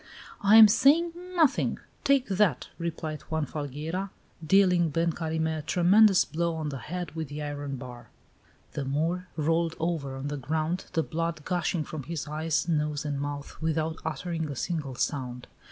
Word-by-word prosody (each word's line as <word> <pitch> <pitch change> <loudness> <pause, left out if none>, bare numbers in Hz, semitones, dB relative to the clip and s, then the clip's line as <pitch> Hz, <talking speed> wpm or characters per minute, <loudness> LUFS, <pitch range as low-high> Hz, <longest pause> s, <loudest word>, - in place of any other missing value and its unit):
"I 205 +2 +6
am 220 -1 +11
saying 280 +10 +4 0.2
nothing. 315 -6 +3 0.3
Take 275 -2 +3
that!" 190 -9 +1
replied 160 -2 -4
Juan 160 -1 0
Falgueira, 155 +7 -4 0.3
dealing 180 0 +4
Ben 165 +3 +1
Carime 160 -1 -1
a - - -4
tremendous 190 +5 +5
blow 170 +1 -1
on 155 -2 -3
the 135 -2 -5
head 175 +4 -5
with 160 -1 -4
the 145 +2 -6
iron 145 -1 -4
bar. 125 -2 -9 0.6
The 145 - -3
Moor 165 +7 -1
rolled 165 +1 +1
over 160 -5 -2
on 135 +2 -5
the 145 - -3
ground, 155 +6 -2
the 160 - +2
blood 165 -1 -3
gushing 175 -2 0
from 155 0 -6
his 160 +2 -5
eyes, 160 +2 -1
nose, 150 -2 0
and 145 -2 -2
mouth, 145 +1 -6
without 160 0 -1
uttering 160 0 -3
a 140 - -4
single 145 -2 -3
sound. 125 -2 -3
160 Hz, 165 wpm, -28 LUFS, 145-175 Hz, 0.6 s, am